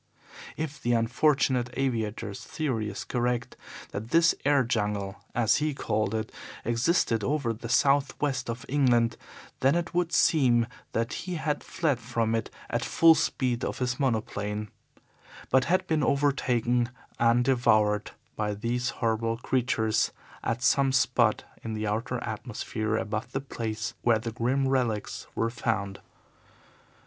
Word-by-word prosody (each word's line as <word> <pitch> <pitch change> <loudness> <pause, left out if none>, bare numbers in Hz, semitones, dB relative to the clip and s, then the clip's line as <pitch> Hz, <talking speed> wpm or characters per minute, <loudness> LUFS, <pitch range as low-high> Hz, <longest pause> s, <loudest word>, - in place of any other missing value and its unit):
If 155 -1 -4
the 120 - +1
unfortunate 125 +1 +2
aviator's 115 -5 -2
theory 120 -9 -2
is 100 - -5
correct 120 -1 -1 0.4
that 110 +3 -5
this 165 +3 +5
air 140 -1 +4
jungle, 105 -3 -1 0.2
as 115 -2 +3
he 150 -1 -1
called 110 -4 -1
it, 110 0 -3 0.3
existed 115 - +1
only 145 +8 +1
over 125 -7 -1
the 115 +1 -8
south 140 +1 +3
west 135 -4 -1
of 120 +4 -5
England, 120 -4 +3 0.4
then 135 +3 +3
it 170 0 -2
would 175 -1 +1
seem 125 -9 +4 0.3
that 115 +1 -1
he 180 0 -4
had 155 -2 -2
fled 145 -7 0
from 115 -1 -1
it 115 - -1 0.2
at - - -1
the - - -3
full 165 -1 +7
speed 130 -5 0
of - - -2
his 125 -1 -1
monoplane, 105 -4 -1 0.8
but 130 0 +4
had 185 +2 +2
been 155 -2 +1
overtaken 125 -4 +1 0.3
and 120 +1 +4
devoured 110 -5 +3 0.3
by 105 -1 -1
these 120 +4 -1 0.2
horrible 115 0 0
creatures 120 -3 +1 0.3
at 115 +2 -2
some 135 0 +4
spot 125 -4 +2 0.2
in 115 - -4
the 110 0 -2
outer 110 +4 -1
atmosphere 110 0 -3
above 105 0 -3
the 135 - 0
place 110 -5 -4
where 115 -2 +4
the 115 +1 -4
grim 130 +5 0
relics 120 -6 -1
were 115 0 0
found. 100 -5 -2
120 Hz, 145 wpm, -28 LUFS, 110-135 Hz, 0.8 s, full